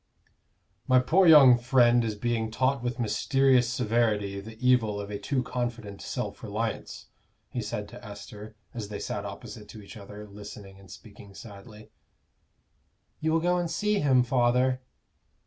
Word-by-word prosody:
"My 130 - +5
poor 165 +9 +4
young 135 -6 +8
friend 120 -1 +4
is 110 -2 -2
being 115 +1 -2
taught 130 +3 0
with 125 +1 -3
mysterious 125 +2 +2
severity 110 -5 0
the 110 +2 -11
evil 115 -4 +2
of 100 0 -6
a 100 - -4
too 130 -3 -1
confident 120 -5 -5
self - - -5
reliance," - - -5 0.4
he - - -3
said 105 0 -5
to - - -12
Esther, 105 +1 -10 0.2
as 110 -4 -5
they 105 0 -6
sat 100 -1 -5
opposite 100 +1 -9
to 110 - -10
each 100 - -12
other, 105 +1 -10
listening 100 -1 -11
and 95 - -17
speaking 100 -2 -14
sadly. 105 +1 -12 1.3
"You 160 +1 0
will 165 0 +2
go 180 +1 +1
and 175 -1 -2
see 210 +5 0
him, 130 -3 +3
father?" 125 +1 +1
120 Hz, 155 wpm, -27 LUFS, 105-130 Hz, 1.3 s, young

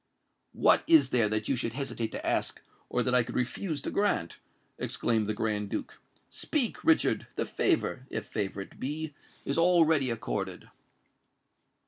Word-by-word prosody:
"What - - +5
is 325 -2 +6
there 115 -4 +3
that 110 0 -1
you 135 - +2
should 115 -2 -2
hesitate 120 -4 -3
to - - -5
ask - - 0 0.3
or 125 - +1
that 125 - 0
I 125 - +6
could 120 +1 -6
refuse 145 +5 -2
to - - -3
grant?" 200 - 0 0.4
exclaimed 110 -3 0
the 110 - -1
Grand 105 -2 -1
Duke. - - -5 0.3
"Speak, 270 -8 -2
Richard:—the 325 0 +2
favour—if 130 - -1
favour 100 -1 -3
it 95 - -11
be—is 150 +1 -4
already 160 -6 +4
accorded." 105 -6 -4
125 Hz, 140 wpm, -29 LUFS, 110-160 Hz, 0.4 s, is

